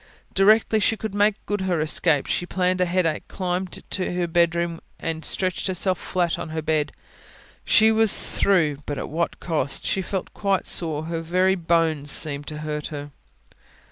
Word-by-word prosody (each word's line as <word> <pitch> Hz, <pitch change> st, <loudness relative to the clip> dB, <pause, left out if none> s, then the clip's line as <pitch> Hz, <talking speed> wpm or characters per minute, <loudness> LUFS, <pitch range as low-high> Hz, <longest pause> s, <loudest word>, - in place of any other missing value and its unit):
Directly 215 Hz, +2 st, +4 dB
she 225 Hz, +1 st, +1 dB
could 215 Hz, -2 st, -5 dB
make 205 Hz, 0 st, +3 dB
good 205 Hz, -1 st, -2 dB
her 185 Hz, -3 st, 0 dB
escape, 155 Hz, -1 st, +2 dB
she 175 Hz, -, -2 dB
pleaded 185 Hz, 0 st, 0 dB
a -, -, +4 dB
headache, 175 Hz, -3 st, 0 dB
climbed 185 Hz, 0 st, -3 dB
to 185 Hz, -2 st, -2 dB
her 180 Hz, -1 st, 0 dB
bedroom 170 Hz, 0 st, +1 dB, 0.2 s
and 160 Hz, -1 st, -3 dB
stretched 185 Hz, 0 st, -1 dB
herself 185 Hz, 0 st, 0 dB
flat 175 Hz, -2 st, -1 dB
on -, -, -5 dB
her 160 Hz, 0 st, -3 dB
bed. 150 Hz, -2 st, 0 dB, 0.7 s
She 220 Hz, 0 st, +5 dB
was 220 Hz, -1 st, +5 dB
through 165 Hz, -8 st, +1 dB
but 145 Hz, -, -3 dB
at -, -, -5 dB
what 165 Hz, +3 st, -1 dB
a -, -, -35 dB
cost! 155 Hz, -5 st, -1 dB
She 190 Hz, -, 0 dB
felt 190 Hz, 0 st, -4 dB
quite 195 Hz, -2 st, 0 dB
sore. 155 Hz, -3 st, 0 dB
Her 165 Hz, 0 st, -4 dB
very 185 Hz, +3 st, +2 dB
bones 165 Hz, -4 st, 0 dB
seemed 145 Hz, 0 st, +3 dB
to 150 Hz, -, -6 dB
hurt 150 Hz, -1 st, -3 dB
her. 145 Hz, -1 st, -7 dB
175 Hz, 175 wpm, -23 LUFS, 160-190 Hz, 0.7 s, She